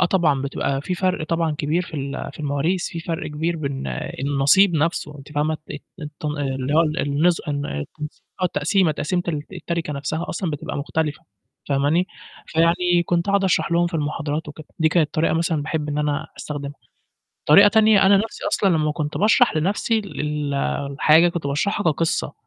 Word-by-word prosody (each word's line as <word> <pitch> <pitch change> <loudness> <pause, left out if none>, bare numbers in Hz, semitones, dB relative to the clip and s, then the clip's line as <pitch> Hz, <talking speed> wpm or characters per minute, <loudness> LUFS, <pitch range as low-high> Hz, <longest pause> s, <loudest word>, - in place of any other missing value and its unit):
آه 185 - +5
طبعًا، 160 -7 +2
بتبقى 140 0 -2
في 180 - -2
فرْق 185 -3 0
طبعًا 165 -1 0
كبير 155 +4 0
في 175 - -10
ال 140 -1 -4
في 145 - -11
المواريث 150 +5 0
في 165 - -6
فرْق 165 -1 -4
كبير 160 +3 -2
بين 140 - -4 0.3
النصيب 140 +7 +4
نفْسه 150 -1 -1
أنتِ 140 +2 -12
فاهمة، 155 +1 0
الت 145 - -6 0.2
الت 150 0 -9
اللي 140 -2 -2
هو 160 - +6
ال 155 -2 0
النز 155 +5 +2 1.0
التقسيمة، 180 -2 +2
تقسيمة 175 +5 -1 0.3
التَرِكة 170 -3 -3
نفْسها 145 +4 -3
أصلًا 175 0 -2
بتبقى 150 -1 -5
مختلفة 150 +1 -2 0.4
فاهماني، 145 +6 +2 0.4
فيعني 175 +2 +2
كنت 170 +1 +1
قعُد 200 0 +2
أشرح 180 -2 +1
لهم 175 +1 +3
في 170 - -6
المحاضرات 150 0 -2
وكده 150 +1 -10
دي 160 -1 +4
كانت 155 -1 +1
طريقة 160 +1 +2
مثلًا 165 -2 0
باحب 150 0 -3
إن 145 - -2
أنا 150 -1 -1
أستخدمها، 145 -1 -5 0.7
طريقة 200 +7 +8
تانية 215 -1 +5
أنا 195 +1 +6
نفْسي 220 +3 -4
أصلًا 195 - +2
لمّا 155 -3 +2
كنت 150 0 -3
باشرح 225 +3 +4
لنفْسي 205 +7 +1
ال 150 -7 -3 0.4
الحاجة 155 +4 +5
كنت 170 -4 -4
باشرحها 200 +9 0
كقصّة، 160 +3 -1
160 Hz, 170 wpm, -22 LUFS, 145-175 Hz, 1.0 s, طريقة